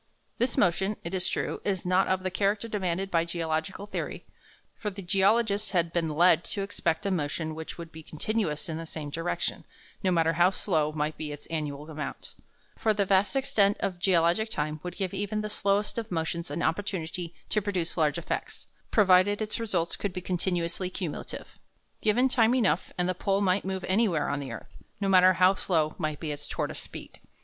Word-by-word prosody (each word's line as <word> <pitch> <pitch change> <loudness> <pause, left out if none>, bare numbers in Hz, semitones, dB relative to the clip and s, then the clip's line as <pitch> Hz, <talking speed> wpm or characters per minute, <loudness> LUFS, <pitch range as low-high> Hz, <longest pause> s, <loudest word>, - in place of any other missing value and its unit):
This 245 0 +1
motion, 190 +3 +2
it 170 - -4
is 185 -1 -1
true, - - -2
is 190 -3 -1
not 185 +1 +3
of 185 0 +1
the 185 - -1
character 200 +4 +1
demanded 195 -2 -2
by 165 -1 +3
geological 170 +2 -2
theory, 205 - -5 0.5
for 210 - -3
the 200 0 -8
geologists 200 +3 +3
had 170 -1 +1
been 165 -2 +1
led 170 +2 +5
to 200 - -2
expect 165 -4 -1
a 200 - +1
motion 160 -1 -1
which 160 0 -7
would 165 -1 -8
be 160 - -10
continuous 160 0 -1
in 160 -1 -3
the 165 - -6
same 150 -2 -5
direction, 165 +3 -2 0.4
no 190 - +3
matter 165 -2 +3
how 175 +2 +5
slow 160 -6 0
might 150 0 -2
be 150 -2 -4
its 145 0 -8
annual 150 -2 -3
amount; 155 -2 -6 0.4
for 220 -1 +1
the 200 -1 +2
vast 195 +2 +3
extent 205 -7 +3
of 185 -3 -2
geologic 180 +4 +3
time 150 -5 -2
would 180 0 -6
give 190 -2 -2
even 205 +2 -1
the 210 0 -4
slowest 205 +2 +1
of 225 - -6
motions 170 0 -2
an - - -2
opportunity 170 -1 -2
to 215 - +2
produce 190 -4 -2
large 155 -3 +2
effects, 170 - -4 0.2
provided 200 -1 +5
its 215 0 -2
results 180 -7 0
could 200 -3 -3
be 185 - -3
continuously 180 0 -1
cumulative. 180 -4 -6 0.4
Given 230 +5 +4
time 240 -2 +4
enough, 195 -9 +2
and 180 0 +2
the 185 - +1
pole 195 +2 0
might 190 0 +2
move 190 -1 -3
anywhere 190 -6 +2
on 145 - -1
the 135 -3 -5
earth, 115 - -9 0.2
no 200 - 0
matter 185 -1 +7
how 185 +2 +5
slow 160 -5 0
might 155 -3 -2
be 155 -2 -3
its 145 0 -6
tortoise - - -3
speed. - - -8
180 Hz, 195 wpm, -28 LUFS, 165-200 Hz, 0.5 s, matter